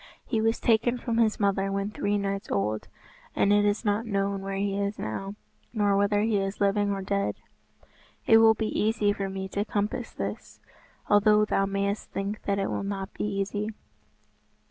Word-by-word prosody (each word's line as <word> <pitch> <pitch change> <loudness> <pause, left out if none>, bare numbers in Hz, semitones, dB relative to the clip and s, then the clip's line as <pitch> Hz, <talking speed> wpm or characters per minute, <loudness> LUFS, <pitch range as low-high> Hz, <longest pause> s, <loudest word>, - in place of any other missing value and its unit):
He 225 -3 0
was 225 +1 +1
taken 240 +2 +2
from 235 -2 -2
his 220 -2 +2
mother 195 -1 +1
when 200 +1 -2
three 205 -1 0
nights 200 0 -3
old, 105 +2 -1 0.5
and 200 - +3
it 205 0 +4
is 205 +2 0
not 205 +2 +1
known 200 -1 -1
where 195 0 -4
he 195 0 -1
is 200 +1 -2
now, 195 - -4 0.4
nor 205 -3 +2
whether 205 +1 +2
he 215 -1 +2
is 195 +1 -3
living 205 0 +2
or 195 -1 -2
dead." 200 +1 -1 0.9
"It 225 - +7
will 225 0 +6
be 220 0 -2
easy 215 -1 +2
for 195 -1 -3
me 190 0 -4
to 200 +1 -1
compass 210 -1 -2
this, - - -6 0.5
although 210 +1 +5
thou 195 -1 +1
mayest 200 +1 -2
think 200 +2 -4
that 200 -1 +1
it 195 - -1
will - - -2
not 195 0 -4
be - - -3
easy." 205 +1 -2
200 Hz, 185 wpm, -27 LUFS, 195-210 Hz, 0.9 s, It